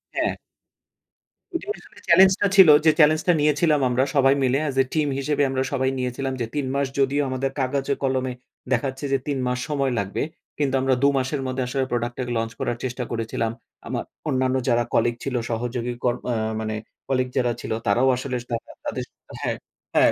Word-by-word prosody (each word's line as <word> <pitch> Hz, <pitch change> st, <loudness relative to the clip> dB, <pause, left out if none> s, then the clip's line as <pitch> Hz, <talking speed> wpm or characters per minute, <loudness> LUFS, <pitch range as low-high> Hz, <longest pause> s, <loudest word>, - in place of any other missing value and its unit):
হ্যাঁ। -, -, +1 dB, 1.2 s
এটি -, -, -2 dB, 0.2 s
আসলে -, -, -19 dB
চ্যালেঞ্জটা 190 Hz, +3 st, +6 dB
ছিল 190 Hz, -5 st, +9 dB, 0.2 s
যে 155 Hz, -, +8 dB
চ্যালেঞ্জটা 155 Hz, +3 st, +5 dB
নিয়েছিলাম 150 Hz, 0 st, +3 dB
আমরা 125 Hz, +2 st, +2 dB
সবাই 135 Hz, 0 st, +5 dB
মিলে 130 Hz, +1 st, +3 dB
as 135 Hz, -, -4 dB
a -, -, -10 dB
team 155 Hz, -2 st, +2 dB
হিসেবে 145 Hz, +1 st, +1 dB
আমরা 130 Hz, 0 st, 0 dB
সবাই 130 Hz, -1 st, +1 dB
নিয়েছিলাম 130 Hz, +1 st, -2 dB
যে -, -, +1 dB
৩ 145 Hz, -2 st, 0 dB
মাস 140 Hz, -1 st, +1 dB
যদিও 140 Hz, +2 st, +2 dB
আমাদের 130 Hz, +1 st, -1 dB
কাগজে 135 Hz, +1 st, 0 dB
কলমে 130 Hz, -1 st, 0 dB, 0.4 s
দেখাচ্ছে 130 Hz, +3 st, -1 dB
যে -, -, +5 dB
৩ 140 Hz, -2 st, 0 dB
মাস 125 Hz, 0 st, -1 dB
সময় 140 Hz, -3 st, 0 dB
লাগবে 100 Hz, 0 st, -2 dB, 0.4 s
কিন্তু 140 Hz, -2 st, +1 dB
আমরা 130 Hz, -1 st, +3 dB
২ -, -, +7 dB
মাসের 135 Hz, +2 st, -1 dB
মধ্যে 130 Hz, 0 st, -1 dB
আসলে 135 Hz, +1 st, 0 dB
প্রোডাক্টের 120 Hz, +1 st, -2 dB
লঞ্চ 115 Hz, 0 st, -1 dB
করার 120 Hz, -, -1 dB
চেষ্টা 125 Hz, 0 st, -3 dB
করেছিলাম। 115 Hz, 0 st, -1 dB, 0.4 s
আমা -, -, -2 dB, 0.3 s
অন্যান্য 130 Hz, 0 st, +1 dB
যারা 120 Hz, 0 st, +3 dB
কলিগ 120 Hz, 0 st, +2 dB
ছিল 135 Hz, -2 st, -3 dB
সহযোগী 120 Hz, +1 st, -2 dB
কর 120 Hz, -1 st, +3 dB, 0.2 s
আ -, -, +1 dB, 0.3 s
মানে 110 Hz, 0 st, -2 dB, 0.3 s
কলিগ 130 Hz, -1 st, +1 dB
যারা 125 Hz, -2 st, +2 dB
ছিল -, -, -6 dB, 0.2 s
তারাও 120 Hz, +6 st, +3 dB
আসলে 130 Hz, 0 st, -3 dB, 0.2 s
তারা, 115 Hz, -, -4 dB
তাদের -, -, -2 dB, 0.4 s
হ্যাঁ, -, -, -1 dB, 0.4 s
হ্যাঁ -, -, +6 dB
130 Hz, 180 wpm, -24 LUFS, 125-140 Hz, 1.2 s, ছিল